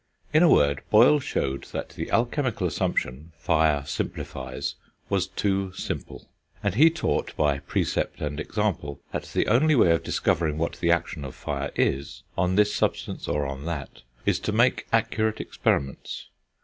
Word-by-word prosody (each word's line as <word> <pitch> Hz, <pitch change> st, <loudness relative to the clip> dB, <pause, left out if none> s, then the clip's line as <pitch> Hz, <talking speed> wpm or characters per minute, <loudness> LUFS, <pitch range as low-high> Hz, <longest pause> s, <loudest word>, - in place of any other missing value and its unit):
In 155 Hz, -, +6 dB
a 175 Hz, -, +6 dB
word, 70 Hz, -, +4 dB
Boyle 120 Hz, +7 st, +6 dB
showed 70 Hz, -, -2 dB
that -, -, -5 dB
the -, -, -6 dB
alchemical 120 Hz, -3 st, 0 dB
assumption 75 Hz, -2 st, -2 dB
fire 80 Hz, -3 st, +2 dB
simplifies 65 Hz, -2 st, -4 dB, 0.4 s
was -, -, +1 dB
too 95 Hz, -2 st, -1 dB
simple; -, -, -6 dB, 0.4 s
and 105 Hz, -3 st, +1 dB
he 150 Hz, +10 st, +7 dB
taught, 165 Hz, -1 st, -2 dB
by 75 Hz, -2 st, +2 dB
precept -, -, -1 dB
and 75 Hz, 0 st, -3 dB
example, 80 Hz, -6 st, -2 dB
that -, -, -3 dB
the -, -, 0 dB
only 145 Hz, +8 st, +4 dB
way 90 Hz, -9 st, +5 dB
of 85 Hz, -, +3 dB
discovering 80 Hz, -2 st, 0 dB
what 85 Hz, +1 st, -2 dB
the 85 Hz, -, +1 dB
action 85 Hz, -2 st, 0 dB
of 65 Hz, -, -7 dB
fire -, -, -3 dB
is, 70 Hz, +1 st, -1 dB
on 90 Hz, +1 st, +1 dB
this 105 Hz, +1 st, +4 dB
substance -, -, -1 dB
or 75 Hz, -1 st, 0 dB
on 70 Hz, +1 st, -5 dB
that, 80 Hz, -5 st, -5 dB, 0.2 s
is -, -, +2 dB
to -, -, -2 dB
make 115 Hz, +4 st, +2 dB
accurate 110 Hz, -1 st, +1 dB
experiments. 70 Hz, -1 st, -2 dB
85 Hz, 160 wpm, -26 LUFS, 70-110 Hz, 0.4 s, he